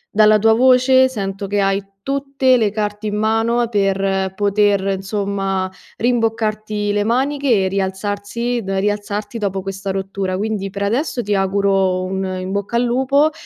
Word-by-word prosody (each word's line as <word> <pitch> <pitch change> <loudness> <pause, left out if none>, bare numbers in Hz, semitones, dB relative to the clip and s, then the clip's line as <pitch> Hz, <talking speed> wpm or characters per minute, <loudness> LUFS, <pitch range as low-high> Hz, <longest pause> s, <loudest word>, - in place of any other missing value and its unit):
Dalla 215 0 +6
tua 220 +1 +4
voce 260 +2 +5
sento 200 -4 -4
che 205 +1 0
hai 195 0 +1 0.2
tutte 275 -1 +1
le 220 -3 +2
carte 210 0 -3
in 210 - -2
mano 225 +3 +1
per 195 -2 0
poter 200 -1 +1
insomma 195 -1 -2 0.3
rimboccarti 215 -3 0
le 205 0 +1
maniche 255 -2 +1
e - - +1
rialzarsi 205 +5 -2
da 195 0 -2
rialzarti 205 +2 -2
dopo 195 -2 -2
questa 195 +1 -5
rottura. 190 -1 -2
Quindi 205 -1 -2
per 200 +1 -4
adesso 240 +4 -1
ti 205 - -1
auguro 195 -1 +1
un 190 +1 -3 0.2
"in 185 +1 -5
bocca 200 +3 -3
al 235 - +3
lupo" 265 +5 +2
205 Hz, 150 wpm, -19 LUFS, 195-230 Hz, 0.3 s, Dalla